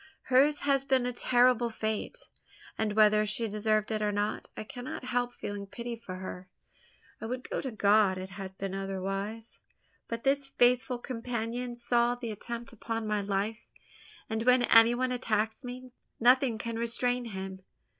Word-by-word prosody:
hers 290 Hz, +3 st, +5 dB
has 275 Hz, -1 st, +2 dB
been 265 Hz, -2 st, +2 dB
a 250 Hz, -, -2 dB
terrible 245 Hz, -1 st, +3 dB
fate; 220 Hz, -1 st, -4 dB, 0.5 s
and 215 Hz, -1 st, -1 dB
whether 215 Hz, 0 st, +5 dB
she 215 Hz, +2 st, -1 dB
deserved 215 Hz, +1 st, 0 dB
it 215 Hz, -1 st, -1 dB
or 210 Hz, -1 st, +1 dB
not, 205 Hz, +1 st, -2 dB
I -, -, -4 dB
cannot 245 Hz, +3 st, -7 dB
help 245 Hz, -1 st, 0 dB
feeling 205 Hz, -1 st, -5 dB
pity 235 Hz, +3 st, -5 dB
for 220 Hz, -5 st, -8 dB
her. 185 Hz, 0 st, -7 dB, 0.7 s
I 225 Hz, -, -4 dB
would 250 Hz, +2 st, -4 dB, 0.2 s
to 265 Hz, -, -3 dB
God 205 Hz, -3 st, +3 dB
it 185 Hz, 0 st, -6 dB
had 190 Hz, 0 st, -8 dB
been 195 Hz, -1 st, -4 dB
otherwise; 195 Hz, +3 st, -4 dB, 0.5 s
but 230 Hz, 0 st, -4 dB
this 275 Hz, 0 st, +2 dB
faithful 250 Hz, -1 st, +2 dB
companion 240 Hz, 0 st, -4 dB
saw 240 Hz, 0 st, +2 dB
the 240 Hz, -2 st, -5 dB
attempt 235 Hz, +3 st, -6 dB
upon 225 Hz, 0 st, -4 dB
my 210 Hz, -1 st, 0 dB
life; 200 Hz, +2 st, -2 dB, 0.6 s
and 220 Hz, 0 st, -2 dB
when 250 Hz, +1 st, +5 dB
any 230 Hz, 0 st, +6 dB
one 255 Hz, +1 st, 0 dB
attacks 220 Hz, -1 st, -1 dB
me, 250 Hz, 0 st, -8 dB, 0.3 s
nothing 250 Hz, 0 st, +4 dB
can 230 Hz, 0 st, -4 dB
restrain 245 Hz, +1 st, 0 dB
him. 190 Hz, -3 st, -6 dB
230 Hz, 160 wpm, -30 LUFS, 210-245 Hz, 0.7 s, any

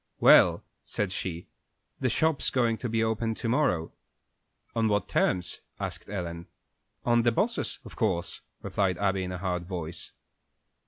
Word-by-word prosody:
"Well," -, -, +7 dB, 0.2 s
said 105 Hz, -3 st, -2 dB
she, 90 Hz, -2 st, -4 dB, 0.5 s
"the -, -, +1 dB
shop's 160 Hz, -2 st, +2 dB
going 120 Hz, -3 st, +2 dB
to 120 Hz, -, -3 dB
be 115 Hz, 0 st, +1 dB
opened 110 Hz, 0 st, 0 dB
to 120 Hz, -, -3 dB
morrow." 115 Hz, -, +1 dB, 0.8 s
"On 115 Hz, -1 st, +2 dB
what 105 Hz, -1 st, +1 dB
terms?" 90 Hz, -1 st, +1 dB, 0.2 s
asked -, -, -5 dB
Ellen. 85 Hz, -3 st, -4 dB, 0.6 s
"On 120 Hz, -1 st, +4 dB
the 120 Hz, 0 st, +3 dB
boss's, 225 Hz, -, 0 dB
of -, -, -10 dB
course," 95 Hz, -7 st, -1 dB, 0.2 s
replied 95 Hz, -3 st, 0 dB
Abby, 95 Hz, -1 st, +1 dB
in 90 Hz, -, -4 dB
a 90 Hz, -, -3 dB
hard 90 Hz, -1 st, -2 dB
voice. 85 Hz, -3 st, -4 dB
100 Hz, 150 wpm, -28 LUFS, 90-115 Hz, 0.8 s, Well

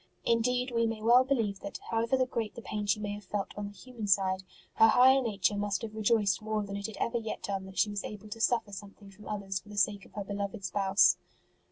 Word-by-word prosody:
Indeed, 250 Hz, +2 st, +1 dB
we 230 Hz, -1 st, +2 dB
may 225 Hz, -1 st, -3 dB
well 240 Hz, +4 st, +6 dB
believe 225 Hz, -7 st, 0 dB
that, 200 Hz, -, -6 dB
how 225 Hz, 0 st, +2 dB
ever 255 Hz, +3 st, +2 dB
great 230 Hz, -4 st, -3 dB
the 235 Hz, -, -9 dB
pain 210 Hz, -1 st, -4 dB
she 205 Hz, +1 st, +2 dB
may 205 Hz, -1 st, -3 dB
have 205 Hz, 0 st, -7 dB
felt 195 Hz, +1 st, -4 dB
on 205 Hz, 0 st, -4 dB
the 205 Hz, -, -12 dB
human 240 Hz, -5 st, -7 dB
side, 190 Hz, -1 st, +2 dB, 0.4 s
her 225 Hz, -, +8 dB
higher 260 Hz, +4 st, +6 dB
nature 205 Hz, -4 st, 0 dB
must 205 Hz, -1 st, -1 dB
have 220 Hz, -1 st, -5 dB
rejoiced 215 Hz, -2 st, +2 dB
more 215 Hz, -1 st, -1 dB
than 200 Hz, 0 st, -6 dB
it 200 Hz, +1 st, -3 dB
had 220 Hz, -, -9 dB
ever 235 Hz, 0 st, 0 dB
yet 220 Hz, -1 st, -5 dB
done 195 Hz, -1 st, -3 dB
that 190 Hz, -, -12 dB
she 210 Hz, -, +3 dB
was 205 Hz, -1 st, -3 dB
able 210 Hz, 0 st, -8 dB
to 225 Hz, +2 st, -7 dB
suffer 230 Hz, -3 st, +1 dB
something 200 Hz, 0 st, -10 dB
from 210 Hz, +2 st, -14 dB
others 195 Hz, -2 st, -3 dB
for 210 Hz, -, -19 dB
the 205 Hz, -, -9 dB
sake 200 Hz, 0 st, +2 dB
of -, -, -19 dB
her 205 Hz, -, -4 dB
beloved 200 Hz, -1 st, -4 dB
Spouse. 195 Hz, +1 st, +4 dB
210 Hz, 245 wpm, -30 LUFS, 200-230 Hz, 0.4 s, her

